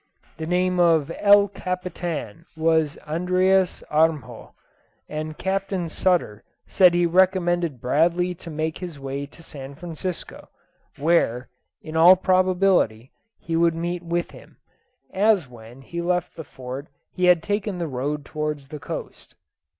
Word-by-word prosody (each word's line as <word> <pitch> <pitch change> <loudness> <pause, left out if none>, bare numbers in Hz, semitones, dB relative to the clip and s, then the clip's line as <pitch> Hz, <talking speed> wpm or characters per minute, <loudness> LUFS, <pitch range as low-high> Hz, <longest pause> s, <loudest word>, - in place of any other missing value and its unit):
The 160 - -5
name 180 +1 +1
of 165 -3 +3
El 205 0 +6
Capitan 180 - -5
was 160 -2 +2
Andreas 185 +3 +1
Armjo; 155 -4 0 0.5
and 155 0 -5
Captain 190 -2 -2
Sutter 160 - 0 0.2
said 180 -3 +4
he 175 0 +3
recommended 175 -4 +2
Bradley 170 +8 +1
to 170 0 -11
make 155 0 -3
his 175 -6 -7
way 135 +1 -5
to 165 +3 -17
San 140 -3 -10
Francisco, 175 +2 -6 0.5
where, 140 -6 +1 0.3
in 155 0 -8
all 170 +3 +8
probability, 185 - +2 0.3
he 165 - -4
would 165 0 +3
meet 175 +1 -3
with 170 0 -2
him, - - -16 0.6
as 200 -5 +3
when 120 +2 -14
he 170 +5 -5
left 180 0 -1
the 160 - -7
Fort 130 +1 -8 0.2
he 180 - 0
had 175 -2 +5
taken 205 -1 -2
the 175 - -2
road 145 +2 -3
towards 150 -2 -4
the 150 - -7
coast. - - -8
170 Hz, 135 wpm, -23 LUFS, 150-180 Hz, 0.6 s, all